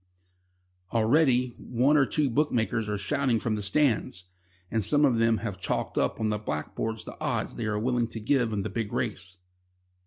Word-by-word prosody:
Already 125 +2 +3
one 125 +5 +2
or 140 -3 +4
two 150 -2 +1
bookmakers 115 -5 0
are 105 - -1
shouting 115 +4 0
from 115 -1 -1
their 105 - -2
stands, 105 -5 +1 0.5
and 110 -1 0
some 145 +9 +4
of 120 -5 +2
them 115 -1 +3
have 95 -4 -5
chalked - - -2
up - - 0
on 110 -1 0
blackboards 105 +8 -3
the - - -8
odds - - -1
they 115 - -3
are 105 -1 -1
willing 120 +1 0
to 115 0 -7
give 115 +1 +1
in 100 -2 -1
the - - -3
big 110 -3 -3
race. 95 +1 -3
115 Hz, 180 wpm, -27 LUFS, 105-130 Hz, 0.5 s, or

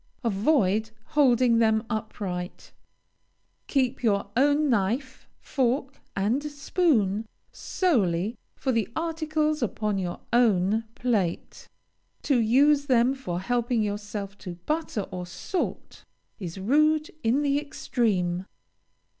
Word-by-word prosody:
Avoid 220 -1 +2 0.2
holding 250 -5 +4
them 220 0 +3
upright. 200 -5 -5 1.0
Keep 265 -2 0
your 200 -4 +1
own 290 +4 +3
knife, 245 +3 -1
fork, 265 +1 -1
and 210 +8 +1
spoon 280 - +1 0.2
solely 215 - 0 0.2
for 265 - -1
the 230 -5 0
articles 315 -2 -1
upon 210 -3 -1
your 175 -2 -4
own 220 -2 +3
plate. 210 -9 -2 0.5
To 275 -4 +2
use 280 +6 +4
them 250 -1 +4
for 180 -10 -4
helping 240 +1 0
yourself 205 -1 -5
to 180 -3 -7
butter 305 -8 -1
or 180 -1 -5
salt, 350 - -4 0.4
is 175 -3 -6
rude 305 +9 +2
in 245 +6 +2
the 285 0 +2
extreme. 190 -10 -1
235 Hz, 105 wpm, -26 LUFS, 200-280 Hz, 1.0 s, holding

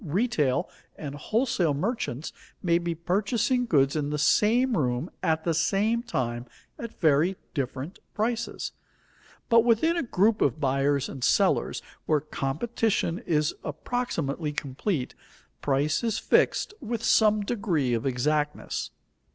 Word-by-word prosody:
Retail 170 - +1 0.3
and 145 -3 -6
wholesale 185 - 0
merchants 160 - -3 0.3
may 170 -1 +3
be 170 -1 -2
purchasing 215 - 0
goods 140 -6 +3
in 145 -2 -1
the 150 - -1
same 230 - +3
room 130 +1 -1
at 160 0 +1
the 170 - +1
same 210 +8 +1
time 125 - -3 0.3
at 230 -1 -8
very 160 +3 +3 0.2
different 140 +4 -4 0.2
prices. 230 +2 -2 0.8
But 230 -1 +5
within 240 +9 +3
a 340 - +1
group 220 -2 +2
of 135 +1 +2
buyers 140 0 +1
and 135 -3 -7
sellers - - +2 0.2
where 155 - +3
competition 170 - -1
is 150 -2 +1
approximately 155 - -2
complete, 140 +1 -2 0.5
price 145 - +1
is 225 -3 0
fixed - - +2
with 235 -2 -3
some 215 -1 +4
degree 180 - 0
of 115 -1 0
exactness. 150 +4 -1
165 Hz, 125 wpm, -27 LUFS, 145-225 Hz, 0.8 s, But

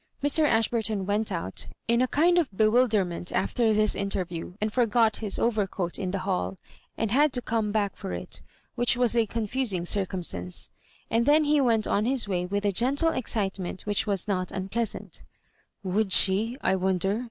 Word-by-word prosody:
Mr. 290 +2 +4
Ashburton 225 -5 +1
went 205 +2 0
out 165 - -3 0.2
m 235 +1 +2
a 255 - +2
kind 345 +6 +3
of 325 - 0
bewilder 215 0 +2
ment 175 0 -4
after 230 -2 +1
this 215 0 +2
interview, 180 -3 -4
and 215 0 -2
forgot 230 -2 +2
his 210 -3 -1
overcoat 200 -6 -1
in 190 -3 -2
the 195 - -2
hall, 190 0 -2 0.4
and 225 -2 -1
had 290 +4 +3
to 250 - 0
come 225 -3 -2
back 205 -2 -1
for - - -7
it, 90 0 -7 0.3
which 240 0 +2
was 245 -1 +2
a 230 -2 +3
confusing 220 -4 -2
circumstance; 175 - -2 0.4
and 230 +1 +1
then 305 +2 +5
he 295 -1 +2
went 230 -4 +2
on 210 - 0
his 255 -2 +1
way 180 -2 -2
with 200 +2 -2
a 205 - +2
gentle 270 - +2
excitement 195 - -2
which 205 +1 0
was 200 -2 -1
not 185 -3 -2
unpleasant 195 +4 -4 0.3
" - - -42
Would 195 +2 -1
she, 215 +6 +5
I 190 - +1
wonder 190 +2 0
215 Hz, 180 wpm, -26 LUFS, 190-235 Hz, 0.4 s, then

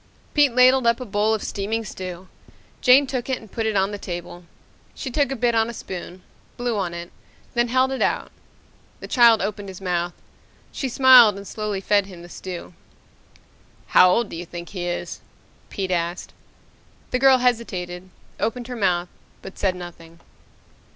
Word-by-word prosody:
Pete 290 -3 +4
ladled 255 0 +5
up 235 +1 +3
a 255 - -6
bowl 210 +1 +1
of 215 - -5
steaming 220 +3 -3
stew. 185 -2 -7 0.5
Jane 265 +2 +6
took 260 -1 -4
it 260 - 0
and 220 -3 -15
put 225 -1 -2
it 220 - -1
on 195 +1 +2
the 205 - -6
table. 175 -1 -7 0.5
She 265 - -5
took 280 0 +1
a - - -1
bit 240 -1 +1
on 225 0 +2
a 235 - -7
spoon, 180 -1 -8 0.3
blew 245 -1 -1
on 180 -4 -2
it, 170 0 -8 0.4
then 240 0 +2
held 260 +2 +2
it 265 - -3
out. - - 0 0.7
The - - -8
child 235 -4 +5
opened 205 -1 -4
his 185 - -9
mouth. 175 -2 -2 0.6
She 265 - -3
smiled 245 -5 +7
and 200 0 -9
slowly 210 -2 -4
fed 200 0 +2
him 175 -3 -11
the 175 - -12
stew. 180 -1 -8 1.2
"How 180 - +7
old 220 +4 +1
do - - -7
you 175 +2 -6
think 175 0 -8
he 180 -3 -5
is?" 175 - -4 0.5
Pete 190 -2 -4
asked. 175 0 -2 0.8
The 250 - +1
girl 265 0 +6
hesitated, 185 -8 -2 0.3
opened 235 +3 -2
her 250 - -4
mouth, 180 -5 +1 0.4
but 195 - -10
said 190 -2 +1
nothing. 170 -2 -11
205 Hz, 180 wpm, -23 LUFS, 180-240 Hz, 1.2 s, smiled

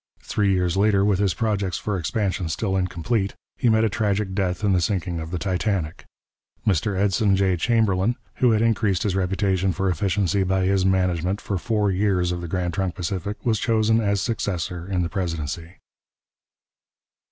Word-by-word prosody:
Three 100 -2 +1
years 90 -2 +1
later, 100 0 +3
with 100 -2 +2
his 100 -4 +1
projects 100 -5 -1
for 105 - -2
expansion 90 +1 -1
still 95 +4 -1
incomplete, 95 +3 -1 0.2
he 125 - +1
met 110 0 +4
a - - +4
tragic 105 -2 -1
death 95 -1 -1
in 100 -2 +3
the 90 - +2
sinking 90 -2 -1
of 80 0 -6
the 90 - -3
Titanic. 90 -3 -2 0.6
Mr 100 0 +1
Edson 100 +1 +2
J. 95 -1 +2
Chamberlin, 110 +1 +1 0.2
who 125 - +4
had 110 -1 +3
increased 105 -5 +1
his 100 -3 0
reputation 95 0 +1
for 95 +2 0
efficiency 100 +1 0
by 95 0 +1
his 95 0 +2
management 90 0 +1
for 100 -6 -3
four 105 0 0
years 95 -2 +1
of 85 0 -3
the 85 - -5
Grand 90 0 -2
Trunk 95 -1 -2
Pacific, 95 +4 -4
was 110 -3 +2
chosen 110 -1 +2
as 100 -2 +1
successor 90 -5 -3
in 90 -2 0
the - - -1
presidency. 85 -2 -4
95 Hz, 175 wpm, -23 LUFS, 90-105 Hz, 0.6 s, met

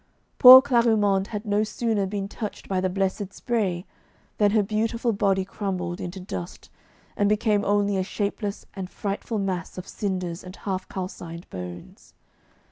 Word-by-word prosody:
Poor 260 +1 +12
Clarimonde 220 -7 +2
had 210 0 -5
no 205 0 +2
sooner 215 -2 -1
been 200 0 -3
touched 210 0 -7
by 190 -1 0
the 185 - 0
blessed 195 +1 -2
spray 195 -8 -2 0.5
than 205 -1 +5
her 210 0 +3
beautiful 225 +3 0
body 195 -2 +1
crumbled 185 -3 -4
into 180 +2 -6
dust, 180 -1 -7 0.4
and 205 0 +2
became 210 -1 +2
only 205 -1 +1
a 190 - +1
shapeless 205 +1 -3
and 190 -2 -5
frightful 205 +3 -4
mass 190 -4 -3
of 185 - -7
cinders 185 -4 -3
and 185 +1 -10
half 190 -2 -4
calcined 175 -2 -7
bones. 90 -1 -9
200 Hz, 150 wpm, -25 LUFS, 185-210 Hz, 0.5 s, Poor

